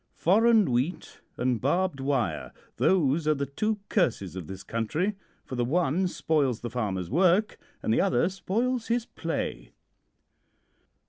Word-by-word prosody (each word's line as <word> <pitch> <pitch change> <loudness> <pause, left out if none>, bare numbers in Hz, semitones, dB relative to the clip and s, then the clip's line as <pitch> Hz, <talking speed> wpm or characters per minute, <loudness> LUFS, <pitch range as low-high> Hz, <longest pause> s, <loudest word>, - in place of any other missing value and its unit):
Foreign 215 - +4
wheat 130 +9 -2 0.2
and 125 -2 0
barbed 170 +2 +1
wire 135 -3 -1 0.3
those 155 -3 +2
are 155 - +4
the 140 0 -2
two 215 +11 -1
curses 115 - 0
of 90 -5 -6
this 95 0 -8
country, 150 - -1 0.3
for - - -9
the 120 -1 0
one 170 +6 +1
spoils 145 -9 0
the 120 - -5
farmer's 100 -7 -2
work 185 - +3 0.2
and 110 - +1
the - - +3
other 125 +7 +2
spoils 225 +6 -1
his 235 0 0
play. - - -4
150 Hz, 140 wpm, -27 LUFS, 120-190 Hz, 0.3 s, Foreign